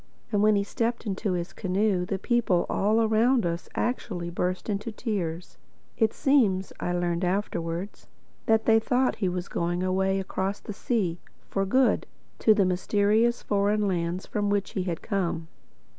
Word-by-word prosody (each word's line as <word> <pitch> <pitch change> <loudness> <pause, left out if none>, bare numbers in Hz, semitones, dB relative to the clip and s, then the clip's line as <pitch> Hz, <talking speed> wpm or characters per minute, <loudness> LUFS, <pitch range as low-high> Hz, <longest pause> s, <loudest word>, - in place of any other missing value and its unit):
And 205 -2 +2
when 215 0 +5
he 200 - +2
stepped 235 +3 -2
into 200 -1 -1
his 175 0 -3
canoe, 190 -1 0
the 195 - -1
people 225 -5 +1
all 215 +3 +2
around 225 +1 +3
us 170 0 -3
actually 185 -8 -2
burst 180 +1 -2
into 210 +2 -2
tears. 185 -7 -4 0.4
It 220 -2 +2
seems 210 -10 +2
(I 175 - -2
learned 175 -1 0
this 180 - +1
afterwards) 180 -1 -3 0.4
that 220 0 +3
they 225 -1 +5
thought 250 +3 +1
he 190 -4 0
was 180 0 -3
going 175 +1 -1
away 190 +1 +1
across 190 +1 -2
the 210 - -7
sea, 195 -6 -1 0.3
for 195 0 0
good, 260 +5 +2 0.3
to 220 - +5
the 200 -2 +3
mysterious 205 +5 +2
foreign 205 +1 +1
lands 175 0 -1
from 205 -1 -1
which 200 -1 0
he 185 - -2
had 170 -3 -3
come. 175 -6 -2
200 Hz, 165 wpm, -27 LUFS, 180-220 Hz, 0.4 s, when